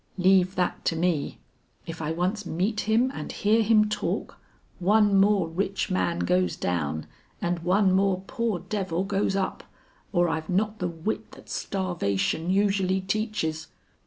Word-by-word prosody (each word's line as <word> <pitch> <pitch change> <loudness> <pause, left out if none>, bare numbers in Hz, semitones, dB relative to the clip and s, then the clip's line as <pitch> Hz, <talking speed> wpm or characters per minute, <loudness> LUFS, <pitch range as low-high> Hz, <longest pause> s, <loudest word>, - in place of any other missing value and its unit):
"Leave 185 0 +4
that 180 -1 -1
to 165 - 0
me! 165 -3 0 0.5
If 165 0 -7
I 155 0 -2
once 185 +6 -1
meet 205 +5 -2
him 240 +4 +3
and - - -6
hear 215 +2 +2
him 215 -1 +4
talk, 210 0 -3 0.4
one 205 +2 +4
more 195 -2 +4
rich 195 +4 -2
man 170 -2 0
goes 180 +1 +1
down 80 -3 -2 0.3
and 175 0 -1
one 190 +3 +3
more 190 0 +2
poor 230 -2 -1
devil 185 -1 -2
goes 195 0 0
up, 195 -1 -2 0.5
or 175 -2 +3
I've 160 -1 -3
not 210 +4 0
the 180 - 0
wit 170 +5 -4
that - - -14
starvation 170 - -1
usually 195 -1 +2
teaches." 190 -6 -2
190 Hz, 150 wpm, -26 LUFS, 175-205 Hz, 0.5 s, Leave